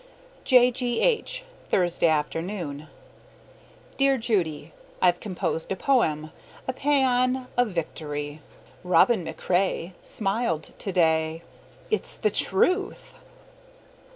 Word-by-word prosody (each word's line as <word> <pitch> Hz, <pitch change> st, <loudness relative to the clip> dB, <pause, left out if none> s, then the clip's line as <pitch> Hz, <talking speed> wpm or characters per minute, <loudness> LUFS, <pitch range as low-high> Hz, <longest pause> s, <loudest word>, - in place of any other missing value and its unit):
J. 250 Hz, -1 st, +6 dB
G. 245 Hz, -1 st, -1 dB
H., -, -, +1 dB, 0.3 s
Thursday 175 Hz, -2 st, +2 dB
afternoon. 155 Hz, 0 st, -2 dB, 1.1 s
Dear 275 Hz, -1 st, +3 dB
Judy: 200 Hz, -, -1 dB, 0.3 s
I've 175 Hz, -1 st, +3 dB
composed 180 Hz, -4 st, -3 dB
a -, -, +1 dB
poem 155 Hz, -, +1 dB, 0.4 s
a 260 Hz, -, -1 dB
paean 260 Hz, -2 st, +2 dB
of 245 Hz, 0 st, +3 dB
victory. 150 Hz, -4 st, -4 dB, 0.4 s
Robin 180 Hz, +4 st, +4 dB
MacRae 180 Hz, +1 st, -1 dB
Smiled 195 Hz, -6 st, -2 dB
today. 160 Hz, -3 st, +1 dB, 0.5 s
It's 435 Hz, -, 0 dB
the -, -, 0 dB
truth! 385 Hz, +2 st, 0 dB
190 Hz, 95 wpm, -25 LUFS, 160-250 Hz, 1.1 s, J